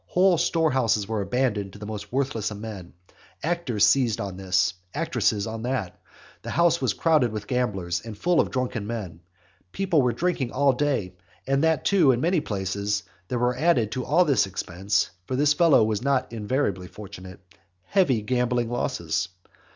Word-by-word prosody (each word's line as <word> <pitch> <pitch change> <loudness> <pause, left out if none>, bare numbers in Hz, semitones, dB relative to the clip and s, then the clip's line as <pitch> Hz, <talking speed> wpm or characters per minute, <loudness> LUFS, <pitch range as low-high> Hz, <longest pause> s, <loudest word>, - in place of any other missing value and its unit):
Whole 180 -2 +3
storehouses 130 - +1
were 110 -2 -1
abandoned 105 -4 -1
to - - -11
the 105 - -8
most 105 -1 -7
worthless 130 -5 -1
of 105 - -7
men. 105 -5 -8 0.5
Actors 155 - +1
seized 125 -6 +3
on 100 -2 -4
this, 95 +1 +1 0.2
actresses 100 -1 0
on 110 0 -5
that, 105 -8 -3 0.4
the - - -7
house 170 +1 +2
was - - 0
crowded 155 -8 +3
with 105 -1 -5
gamblers, 100 -8 -1
and 110 -2 -9
full 175 +8 +2
of - - +2
drunken 125 -5 -2
men, 105 -8 -5 0.5
people 185 -6 +1
were 125 -1 +2
drinking 135 -1 -1
all 140 0 +3
day, 130 -9 -1 0.3
and 135 +2 +1
that 160 -1 +2
too 180 -9 +5
in 120 - 0
many 170 +3 +2
places, 100 0 -2 0.2
there 125 - -2
were 125 +1 +1
added 130 -7 +2
to 130 +3 -3
all 180 +7 +3
this 130 - +3
expense 95 +1 -1 0.2
(for 130 - -2
this 145 +2 +3
fellow 160 -7 +5
was 110 -1 0
not 130 -2 0
invariably 105 -4 -1
fortunate) 95 -1 -10 0.4
heavy 135 - +2
gambling 125 0 0
losses. 120 -5 -1
120 Hz, 170 wpm, -25 LUFS, 100-140 Hz, 0.5 s, too